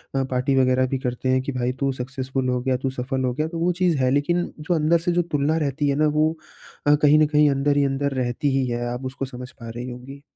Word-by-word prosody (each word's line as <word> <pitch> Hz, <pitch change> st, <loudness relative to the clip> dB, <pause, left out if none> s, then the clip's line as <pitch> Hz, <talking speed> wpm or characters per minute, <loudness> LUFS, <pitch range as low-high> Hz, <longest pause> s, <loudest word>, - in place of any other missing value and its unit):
अ, 135 Hz, -, +2 dB
party 130 Hz, +1 st, 0 dB
वग़ैरह 130 Hz, 0 st, +3 dB
भी 135 Hz, -, -1 dB
करते 125 Hz, 0 st, -3 dB
हैं 130 Hz, 0 st, +3 dB
कि 135 Hz, -, -4 dB
भाई 125 Hz, -1 st, -1 dB
तू 135 Hz, -1 st, +1 dB
सक्सेसफुल 130 Hz, 0 st, -3 dB
हो 125 Hz, 0 st, +1 dB
गया, 130 Hz, 0 st, 0 dB
तू 130 Hz, +1 st, -2 dB
सफल 130 Hz, +1 st, -3 dB
हो 125 Hz, -, 0 dB
गया 155 Hz, +5 st, -1 dB
तो 165 Hz, 0 st, -5 dB
वो 175 Hz, +2 st, +2 dB
चीज़ 175 Hz, -4 st, +3 dB
है, 130 Hz, -1 st, +2 dB
लेकिन 160 Hz, +6 st, +1 dB, 0.2 s
जो 155 Hz, +4 st, -1 dB
अंदर 160 Hz, +2 st, +3 dB
से 170 Hz, +2 st, -1 dB
जो 175 Hz, 0 st, +2 dB
तुलना 145 Hz, +2 st, +1 dB
रहती 145 Hz, -1 st, 0 dB
है 140 Hz, -, +1 dB
ना 155 Hz, -, +4 dB
वो 155 Hz, +1 st, +2 dB, 0.6 s
अ, 145 Hz, -, +7 dB
कहीं 150 Hz, +1 st, +4 dB
न 155 Hz, -, +5 dB
कहीं 150 Hz, 0 st, +4 dB
अंदर 140 Hz, +1 st, +1 dB
ही 140 Hz, -, +3 dB
अंदर 140 Hz, +1 st, -1 dB
रहती 125 Hz, +4 st, -1 dB
ही 130 Hz, -1 st, +1 dB
है। 120 Hz, 0 st, -2 dB
आप 125 Hz, +2 st, -6 dB
उसको 135 Hz, +1 st, -4 dB
समझ 125 Hz, -1 st, -9 dB
पा 115 Hz, -3 st, -10 dB
रही 120 Hz, +2 st, -6 dB
होंगी। 125 Hz, +3 st, -10 dB
135 Hz, 265 wpm, -23 LUFS, 130-150 Hz, 0.6 s, अ